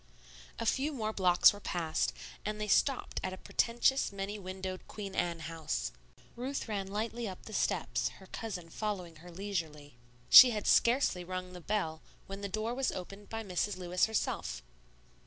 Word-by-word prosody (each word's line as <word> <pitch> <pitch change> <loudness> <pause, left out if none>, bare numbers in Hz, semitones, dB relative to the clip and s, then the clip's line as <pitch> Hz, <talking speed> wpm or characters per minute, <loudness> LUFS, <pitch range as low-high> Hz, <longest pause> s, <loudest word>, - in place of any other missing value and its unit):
A 230 - -3
few 275 +6 +1
more 220 -4 -2
blocks 180 -2 +6
were 205 - -9
passed, 165 -5 -1 0.3
and 210 0 -3
they 210 - -2
stopped 265 +6 +2
at 185 - -2
a - - -7
pretentious, 240 +6 +1
many 200 +1 -4
windowed, 185 0 -6
Queen 200 -2 -6
Anne 170 -2 -1
house. 155 - -3 0.4
Ruth 260 +3 -3
ran 200 -3 -2
lightly 225 +3 -3
up 185 - -9
the 220 - -9
steps, - - 0
her 190 - -14
cousin 185 -5 -6
following 185 -6 -4
her 175 +3 -13
leisurely. 165 -7 -5 0.3
She 255 - +12
had 215 -3 -3
scarcely 235 -7 +3
rung 185 0 -5
the 180 - -9
bell 165 -5 -1 0.2
when 195 +1 -7
the 200 - -3
door 215 +4 -2
was 265 +1 0
opened 195 +3 -8
by 225 0 -4
Mrs. 195 0 -1
Lewis 180 0 +1
herself. 60 - -2
195 Hz, 170 wpm, -32 LUFS, 180-215 Hz, 0.4 s, She